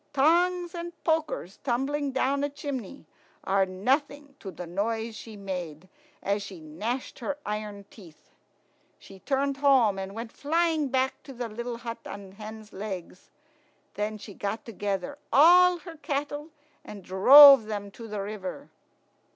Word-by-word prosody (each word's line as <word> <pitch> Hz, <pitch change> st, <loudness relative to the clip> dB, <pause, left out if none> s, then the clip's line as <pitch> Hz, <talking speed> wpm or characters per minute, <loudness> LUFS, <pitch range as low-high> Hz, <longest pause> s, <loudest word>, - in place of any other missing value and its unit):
Tongs 345 Hz, +5 st, +2 dB
and 345 Hz, 0 st, -6 dB
pokers 315 Hz, -, -1 dB
tumbling 275 Hz, +3 st, -1 dB
down 270 Hz, +2 st, 0 dB
a 285 Hz, -, 0 dB
chimney 280 Hz, -, -6 dB, 0.4 s
are 195 Hz, 0 st, +2 dB
nothing 275 Hz, +9 st, -1 dB
to 195 Hz, -, -7 dB
the 180 Hz, 0 st, -8 dB
noise 220 Hz, +5 st, -2 dB
she 220 Hz, -1 st, -10 dB
made 180 Hz, -4 st, -6 dB, 0.4 s
as 200 Hz, +1 st, 0 dB
she 195 Hz, -3 st, -8 dB
gnashed 205 Hz, -, -5 dB
her 280 Hz, +4 st, -3 dB
iron 210 Hz, -1 st, -5 dB
teeth. 170 Hz, -8 st, -16 dB, 0.7 s
She 195 Hz, -, -14 dB
turned 275 Hz, +3 st, -1 dB
home, 260 Hz, -8 st, +4 dB
and 195 Hz, +1 st, -6 dB
went 230 Hz, 0 st, -6 dB
flying 320 Hz, 0 st, 0 dB
back 265 Hz, 0 st, 0 dB
to 275 Hz, -, -11 dB
the 240 Hz, -1 st, -4 dB
little 235 Hz, +2 st, -5 dB
hut 230 Hz, -1 st, -6 dB
on 200 Hz, -1 st, -9 dB
hen's 215 Hz, +1 st, -10 dB
legs. 190 Hz, -3 st, -7 dB, 0.6 s
Then 210 Hz, +1 st, -3 dB
she 210 Hz, 0 st, -10 dB
got 205 Hz, +3 st, -4 dB
together 205 Hz, +4 st, -4 dB
all 355 Hz, +6 st, +7 dB
her 335 Hz, -1 st, -11 dB
cattle 290 Hz, +1 st, -4 dB, 0.3 s
and 200 Hz, -2 st, -10 dB
drove 270 Hz, +7 st, +9 dB
them 205 Hz, -2 st, -5 dB
to 230 Hz, +3 st, -10 dB
the 210 Hz, -2 st, -4 dB
river. 205 Hz, +5 st, -7 dB
230 Hz, 145 wpm, -27 LUFS, 200-285 Hz, 0.7 s, drove